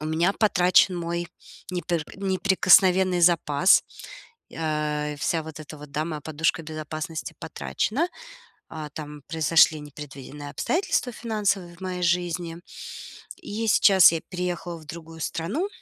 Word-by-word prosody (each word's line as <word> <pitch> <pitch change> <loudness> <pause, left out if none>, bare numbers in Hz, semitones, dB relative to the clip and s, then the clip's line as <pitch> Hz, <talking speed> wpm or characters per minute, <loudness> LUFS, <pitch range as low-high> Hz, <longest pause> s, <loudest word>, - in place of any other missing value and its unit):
У 155 - -4
меня 165 +5 +2
потрачен 180 -3 +4
мой 170 0 -3 0.4
непер 175 -2 -2
неприкосновенный 190 -1 +4
запас. 170 0 +4 0.7
А, 150 -2 -1
вся 160 +2 -1
вот 155 -1 -9
эта 155 0 -10
вот, 145 -1 -12
да, 150 +1 -1
моя 155 -2 -5
подушка 160 +2 -1
безопасности 155 0 -6
потрачена. 220 - -2 0.6
А, 155 -2 -7
там 150 -1 -8
произошли 160 0 +4
непредвиденные 145 0 -9
обстоятельства 335 - 0
финансовые 205 -6 -2
в - - -22
моей 185 -1 -4
жизни. 175 -1 -1 0.8
И 360 -6 -12
я 225 +2 -2
сейчас 195 -4 +7
я 165 - -2
переехала 180 -1 -4
в 155 - -15
другую 165 +1 -10
страну. 205 - -2
170 Hz, 130 wpm, -25 LUFS, 155-185 Hz, 0.8 s, сейчас